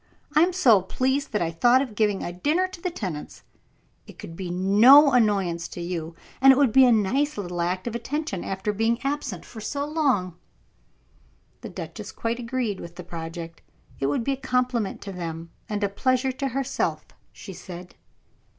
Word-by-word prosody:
I 305 - +6
am 350 +2 +4
so 250 - +5
pleased 260 +8 -1
that 210 - 0
I 165 - -2
thought 240 +10 +4
of 260 -5 -3
giving 210 -2 0
a 175 - -4
dinner 305 - +1
to 370 -2 -12
the 360 - -1
tenants; 185 - -6 0.6
it - - -13
could 165 - -9
be 185 0 -5
no 215 +11 +6
annoyance 195 -8 +1
to - - -9
you, 170 -2 -4 0.3
and 270 0 +9
it 265 - +4
would 275 -5 +4
be 265 +3 +7
a - - +5
nice 245 +7 +1
little 175 -3 -4
act 180 +2 -2
of 235 - -3
attention, 235 - -3
after 195 +2 -3
being 225 +3 +1
absent 275 - -3
so 240 +6 -4
long." 265 - 0 1.2
The - - -7
duchess - - -8
quite 230 +1 -3
agreed 235 -4 -2
with 170 0 -9
the 180 - -8
project. 165 0 -7 0.4
It 135 - 0
would 145 +11 0
be 275 - 0
a - - -5
compliment 250 -5 -1
to 200 - -7
them, 165 -2 -6 0.2
and 210 -1 -2
a - - +3
pleasure 255 +6 0
to 270 +2 -3
herself, 270 +1 -2 0.3
she 195 - -10
said. 180 0 -10
215 Hz, 185 wpm, -25 LUFS, 180-265 Hz, 1.2 s, and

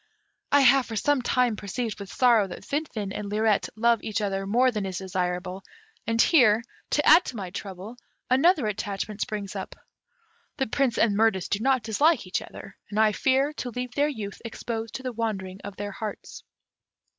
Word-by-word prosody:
I 285 - +6
have 265 0 +5
for 225 - -6
some 285 +5 +2
time 245 -2 +1
perceived 210 +2 -4
with 200 -1 -8
sorrow 235 -5 +4
that 175 - -9
Finfin 260 -9 -3
and 205 -1 -5
Lirette 215 0 +1
love 235 0 +2
each 215 0 -2
other 195 -2 -2
more 250 +5 +3
than 210 -3 -3
is 190 -2 -4
desirable, 185 0 -3 0.5
and 230 0 0
here, 230 -7 +5 0.3
to 295 - +1
add 345 - +8
to - - -6
my 190 -4 -5
trouble, 195 +4 -7 0.3
another 280 +2 +4
attachment 205 0 -4
springs 205 -2 -4
up: 190 - -6 0.8
the 265 - +1
Prince 260 0 0
and 215 -3 +3
Mirtis 205 -4 +2
do 200 - 0
not 260 +1 +2
dislike 260 +6 +2
each 185 - -2
other, 195 - -11
and 210 - -2
I 220 -1 +5
fear 270 +6 +1
to 250 - -4
leave 250 +1 -5
their 290 +1 +2
youth 210 -8 -6
exposed 225 -1 -5
to 265 - -6
the 255 -1 -3
wandering 195 -5 -3
of 200 -1 -7
their 205 0 -5
hearts." 210 +1 -7
220 Hz, 185 wpm, -26 LUFS, 200-250 Hz, 0.8 s, add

